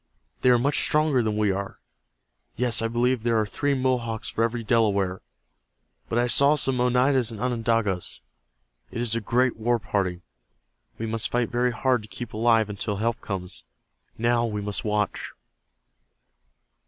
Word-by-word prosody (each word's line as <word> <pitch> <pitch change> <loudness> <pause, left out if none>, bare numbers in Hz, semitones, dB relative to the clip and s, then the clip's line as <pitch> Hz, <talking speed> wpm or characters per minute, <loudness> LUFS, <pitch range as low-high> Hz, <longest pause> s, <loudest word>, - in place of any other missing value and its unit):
They 125 - +4
are 125 - +6
much 140 +4 +1
stronger 150 -4 +3
than 110 -2 -1
we 105 -2 +2
are. 100 +1 -4 0.8
Yes, 120 -2 +1
I 115 - 0
believe 120 +1 +1
there 115 0 +1
are 110 - +1
three 140 +7 -1
Mohawks 125 -4 -1
for 115 - -1
every 115 0 -1
Delaware. 100 -5 +1 0.9
But 115 - -1
I 120 - +3
saw 140 +5 +4
some 130 -3 0
Oneidas 125 0 +2
and 110 -3 -8
Onondagas. 115 -6 -1 0.7
It - - -6
is 120 -2 +1
a 115 - 0
great 125 +3 +1
war 120 +2 +1
party. 95 -5 -2 0.7
We 115 - -4
must 115 0 -1
fight 120 -2 -1
very 125 +1 +1
hard 125 -1 +1
to 105 - -12
keep 120 +1 -7
alive 115 0 +3
until 105 0 -3
help 115 +3 -1
comes. 90 - -6 0.5
Now 120 +1 +2
we 105 -3 -2
must 105 0 -3
watch." 105 -1 -2
115 Hz, 160 wpm, -25 LUFS, 105-125 Hz, 0.9 s, are